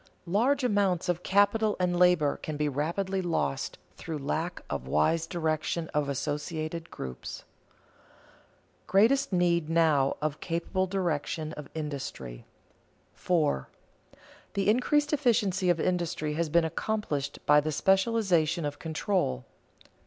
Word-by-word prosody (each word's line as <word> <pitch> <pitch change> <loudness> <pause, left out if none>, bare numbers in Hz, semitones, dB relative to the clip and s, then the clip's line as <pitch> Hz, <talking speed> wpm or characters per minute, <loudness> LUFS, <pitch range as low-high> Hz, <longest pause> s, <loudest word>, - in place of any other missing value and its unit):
Large 245 +10 +2
amounts 200 -7 +1
of 175 0 0
capital 205 +3 +3
and 180 -1 +1
labor 175 -5 +4
can 155 -1 -5
be 150 0 0
rapidly 170 +7 -1
lost 160 - -2 0.2
through 160 -2 -5
lack 160 +5 -3
of 70 -3 -4
wise 75 - +2
direction 160 -1 -1
of 150 -1 0
associated 155 +4 -3
groups. 65 -1 -7
[Sidenote: - - -18
Greatest 225 +8 +3
need 170 -3 +2
now 155 -5 +3
of 150 -1 -2
capable 180 +2 -1
direction 160 -4 -2
of 150 -2 -9
industry] 140 - -5 0.7
4. 150 - 0 0.9
_The 200 -1 0
increased 290 +8 +2
efficiency 215 -9 +2
of 175 -2 +3
industry 170 -4 -1
has 165 +1 -1
been 170 +2 +3
accompanied 160 -5 -2
by 150 0 +6
the 155 +1 -2
specialization 190 -3 +2
of 145 0 -4
control. 160 - -1
165 Hz, 125 wpm, -28 LUFS, 150-190 Hz, 0.9 s, by